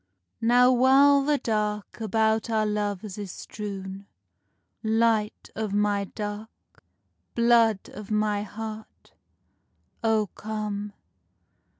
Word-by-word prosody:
Now 245 +2 +5
while 270 +3 +5
the 290 +1 +2
dark 210 -2 -2
about 220 +1 +1
our 220 -1 +1
loves 205 -1 -3
is 200 -3 -5
strewn, 195 -1 -7 0.7
Light 220 -1 +1
of 215 -2 -3
my 205 -1 +1
dark, 210 +2 -8 0.5
blood 235 -3 +3
of 210 0 -9
my 210 -1 +1
heart, 215 +1 -8 0.9
O 220 -1 +2
come! 210 -1 -4
215 Hz, 95 wpm, -26 LUFS, 205-225 Hz, 0.9 s, Now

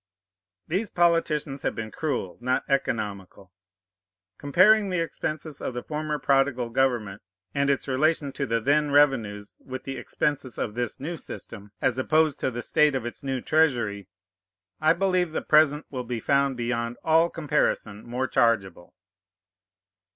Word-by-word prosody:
These 190 +6 -1
politicians 160 -5 +1
have - - -2
been 110 -1 -5
cruel, 140 - -3
not 125 +1 0
economical. 100 -8 -3 0.9
Comparing 195 +8 +4
the 180 -2 0
expenses 155 -2 -4
of 125 - -4
the 125 - -4
former 150 0 -3
prodigal 135 -3 +1
government 115 -6 0 0.3
and 140 0 +1
its 140 0 0
relation 145 +2 +1
to 140 0 -3
the 115 0 +1
then 145 +5 +2
revenues 115 -8 +2
with 130 0 -8
the 135 - -5
expenses 140 -4 -2
of 105 - -3
this 120 -1 -3
new 165 +5 -4
system 105 -8 -10
as 125 +1 +1
opposed 155 +2 +2
to - - 0
the 120 -1 -5
state 150 -2 +3
of 125 -3 -2
its 120 - -7
new 135 -2 -3
treasury, 120 - +1 0.7
I 155 +1 +4
believe 180 -2 0
the - - -2
present 150 -1 +4
will 130 -2 -4
be 120 -1 -4
found 140 +2 +1
beyond 120 0 -2
all 165 +1 +4
comparison 145 -10 -1
more 125 +2 -2
chargeable. 95 -9 0
135 Hz, 150 wpm, -26 LUFS, 120-155 Hz, 0.9 s, Comparing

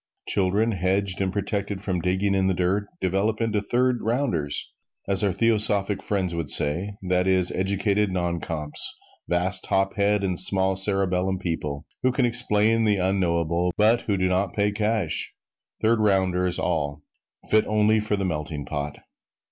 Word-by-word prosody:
Children 100 +4 +1
hedged 95 0 0
and 95 -1 0
protected 100 0 -3
from 95 -2 -2
digging 95 +3 0
in 95 -1 +2
the 95 - +1
dirt 95 +3 0
develop 95 +4 0
into 110 -3 0
"third 125 +3 +1
rounders," 110 - -1 0.3
as 95 0 +1
our 100 - +2
theosophic 105 -1 +2
friends 95 -4 -2
would 85 -3 -3
say, 90 +8 0
that 90 0 +1
is, 95 -1 +2
educated 100 +2 0
non 85 -2 -1
comps 75 -2 -3 0.3
vast 90 +2 0
top 95 0 0
head 100 0 +2
and 90 -3 -1
small 95 0 +1
cerebellum 95 -1 0
people 80 -5 -4 0.2
who 130 - +2
can 130 0 +1
explain 115 -2 +3
the 105 -2 +2
unknowable, 90 -2 0
but 110 +3 +4
who 100 -3 -1
do 95 0 +1
not 95 +2 0
pay 105 0 +1
cash. 105 -5 -1 0.5
Third 115 +1 +3
rounders 95 -3 +1
all 75 -4 -2 0.5
fit 110 0 +4
only 110 +1 +3
for 105 0 -1
the 100 -1 -2
melting 75 -3 -4
pot! 75 -1 -5
95 Hz, 155 wpm, -24 LUFS, 90-105 Hz, 0.5 s, but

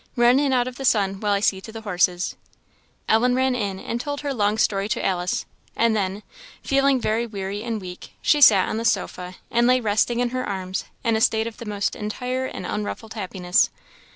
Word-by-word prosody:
"Run 240 +2 +5
in 285 -1 +1
out 250 -1 +2
of 250 -1 -7
the 270 - -6
sun, 195 -6 +2
while 210 0 0
I 200 0 +2
see 190 -2 +1
to 220 - -10
the 225 0 -8
horses." 180 -3 0 0.7
Ellen 245 +3 +3
ran 260 0 +2
in, 200 -5 -2
and 235 +4 -3
told 285 +1 -4
her 285 -2 -2
long 210 -3 +1
story 200 -1 +1
to - - -1
Alice; 180 -1 -1 0.3
and 230 -1 +2
then, 200 0 -2 0.4
feeling 275 -1 +3
very 230 +1 0
weary 200 -1 -5
and 230 -1 -3
weak, 180 -2 -9
she 295 - +2
sat 200 -8 +7
on 215 - -2
the 225 - -2
sofa, 180 -4 -1 0.2
and 240 0 +3
lay 255 0 +4
resting 225 +1 +1
in 245 0 +1
her 255 +1 -2
arms 190 -1 -4 0.2
in 230 -2 +2
a 220 - 0
state 220 -2 +3
of 230 -1 -6
the 235 - -8
most 205 -2 -2
entire 250 +5 -3
and - - -7
unruffled 210 +1 -4
happiness. 185 -4 +1
220 Hz, 210 wpm, -23 LUFS, 195-245 Hz, 0.7 s, sat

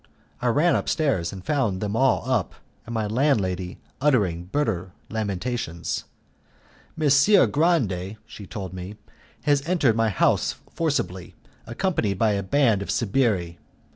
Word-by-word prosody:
I 125 - 0
ran 150 +9 +3
upstairs, 135 - 0
and 95 -2 -9
found 125 -11 0
them 105 +1 -2
all 130 +1 +3
up, - - 0 0.3
and 115 - -5
my 110 -1 0
landlady 105 -7 0 0.2
uttering 100 - +2
bitter 95 -6 -2 0.2
lamentations. 105 -3 -3 0.9
"Messer 155 +6 +5
Grande," 110 - +1
she 105 -3 -11
told 95 -3 -6
me, 95 +3 -7 0.5
"has 145 -1 +3
entered 145 -11 +3
my 115 -1 +2
house 100 - +2 0.2
forcibly, 140 - -2 0.3
accompanied 120 - -1
by 110 +2 +3
a 100 -1 0
band 110 0 +2
of 100 - -6
sbirri. 100 -7 0
110 Hz, 130 wpm, -24 LUFS, 95-140 Hz, 0.9 s, Messer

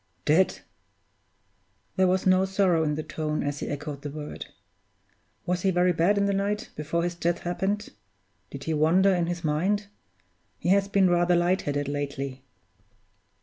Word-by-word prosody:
"Dead!" 165 +5 +3 1.3
There 185 -1 +3
was 185 +1 +1
no 185 0 +4
sorrow 190 -4 +2
in 150 -1 0
the 155 - -4
tone 155 -1 -3
as 145 0 -3
he - - -4
echoed 145 -1 -5
the 145 - -5
word. 150 +1 -7 1.0
"Was 180 0 -1
he 195 - +2
very 180 0 +3
bad 175 +5 +2
in 200 - +2
the 200 - +1
night 200 +2 -2
before 155 +3 -2
his 175 0 -1
death 170 0 -1
happened? 195 +4 -2 0.6
Did 140 0 -8
he 160 - -2
wander 175 +6 +4
in 175 -2 0
his 175 0 -4
mind? 185 +7 0 0.7
He - - -3
has 195 +1 +4
been 200 -1 +3
rather 175 0 +3
light 175 +2 +2
headed 145 -1 -2
lately." 140 -2 -4
175 Hz, 165 wpm, -26 LUFS, 150-190 Hz, 1.3 s, no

